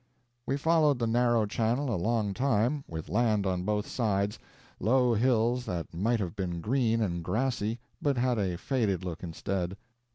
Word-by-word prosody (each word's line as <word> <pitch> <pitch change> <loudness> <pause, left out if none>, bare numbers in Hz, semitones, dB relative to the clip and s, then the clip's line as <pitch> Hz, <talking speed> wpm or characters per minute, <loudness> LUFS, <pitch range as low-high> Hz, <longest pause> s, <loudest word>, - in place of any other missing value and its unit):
We 135 - +1
followed 155 -2 +3
the 120 - 0
narrow 120 -1 +3
channel 120 +5 0
a - - +1
long 105 +2 0
time, 130 +3 +1
with 80 -1 -6
land 105 +2 +1
on 90 -2 0
both 105 +2 -1
sides 105 -2 -1 0.4
low 125 +3 +3
hills 120 +1 +2
that 85 -8 -4
might 110 +7 +1
have 90 -5 -3
been 90 -3 -3
green 115 +3 +1
and 85 -5 -1
grassy, 110 +3 -1 0.2
but 140 -3 +1
had 120 -2 +1
a 90 -4 -1
faded 100 -4 0
look 85 -2 -5
instead. 90 +2 -3
110 Hz, 165 wpm, -29 LUFS, 95-125 Hz, 0.4 s, followed